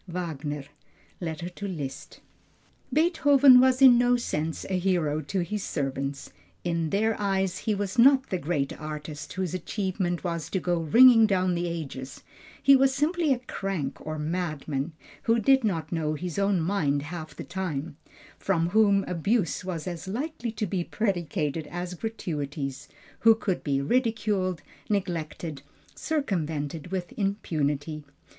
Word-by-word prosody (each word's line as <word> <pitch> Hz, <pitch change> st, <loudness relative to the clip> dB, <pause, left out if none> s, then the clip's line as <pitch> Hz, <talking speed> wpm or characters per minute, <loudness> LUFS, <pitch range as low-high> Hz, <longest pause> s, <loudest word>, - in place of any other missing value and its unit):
WAGNER: 150 Hz, -5 st, -4 dB, 0.6 s
Letter 170 Hz, 0 st, -4 dB
to 190 Hz, +3 st, -6 dB
Liszt. 150 Hz, -8 st, -6 dB, 0.7 s
Beethoven 285 Hz, -5 st, +6 dB
was 260 Hz, +1 st, +4 dB
in 245 Hz, -2 st, +9 dB
no 245 Hz, 0 st, +4 dB
sense 160 Hz, -8 st, -3 dB
a 185 Hz, -1 st, 0 dB
hero 170 Hz, -5 st, +1 dB
to 185 Hz, +6 st, -2 dB
his 205 Hz, +4 st, -3 dB
servants. 140 Hz, -1 st, -3 dB, 0.3 s
In 170 Hz, -2 st, -1 dB
their 220 Hz, +4 st, +1 dB
eyes 190 Hz, -2 st, 0 dB
he 215 Hz, -2 st, 0 dB
was 200 Hz, +3 st, -3 dB
not 265 Hz, +2 st, +6 dB
the 185 Hz, -, 0 dB
great 145 Hz, -4 st, -1 dB
artist, 150 Hz, -1 st, -6 dB
whose 185 Hz, -2 st, -2 dB
achievement 185 Hz, -1 st, -2 dB
was 170 Hz, -3 st, -3 dB
to 190 Hz, -, -1 dB
go 175 Hz, -1 st, 0 dB
ringing 225 Hz, -, +7 dB
down 185 Hz, -3 st, +1 dB
the 175 Hz, 0 st, -1 dB
ages; 140 Hz, -6 st, -6 dB, 0.4 s
he 275 Hz, -, +8 dB
was 270 Hz, 0 st, +3 dB
simply 315 Hz, +2 st, +1 dB
a 260 Hz, -, +3 dB
crank 190 Hz, -, -4 dB
or 155 Hz, 0 st, -4 dB
madman, 155 Hz, -2 st, -3 dB, 0.3 s
who 230 Hz, +1 st, +4 dB
did 265 Hz, +4 st, +4 dB
not 175 Hz, -7 st, -1 dB
know 155 Hz, -2 st, -1 dB
his 180 Hz, +3 st, -4 dB
own 195 Hz, -2 st, +2 dB
mind 160 Hz, -6 st, 0 dB
half 155 Hz, 0 st, -7 dB
the -, -, -6 dB
time, 165 Hz, -5 st, -4 dB, 0.4 s
from 170 Hz, -3 st, +1 dB
whom 200 Hz, -1 st, +4 dB
abuse 180 Hz, +1 st, 0 dB
was 175 Hz, -4 st, -4 dB
as 175 Hz, -1 st, -5 dB
likely 240 Hz, +2 st, -3 dB
to 215 Hz, -1 st, -2 dB
be 185 Hz, -2 st, -1 dB
predicated 165 Hz, -7 st, -2 dB
as 175 Hz, +2 st, -5 dB
gratuities, 145 Hz, -, -4 dB, 0.3 s
who 225 Hz, 0 st, +6 dB
could 195 Hz, -4 st, -2 dB
be 140 Hz, -2 st, 0 dB
ridiculed, 210 Hz, -, 0 dB, 0.3 s
neglected, 170 Hz, -6 st, -3 dB, 0.3 s
circumvented 165 Hz, -, -2 dB
with 180 Hz, -1 st, -4 dB
impunity. 155 Hz, -7 st, -1 dB
180 Hz, 145 wpm, -27 LUFS, 155-210 Hz, 0.7 s, in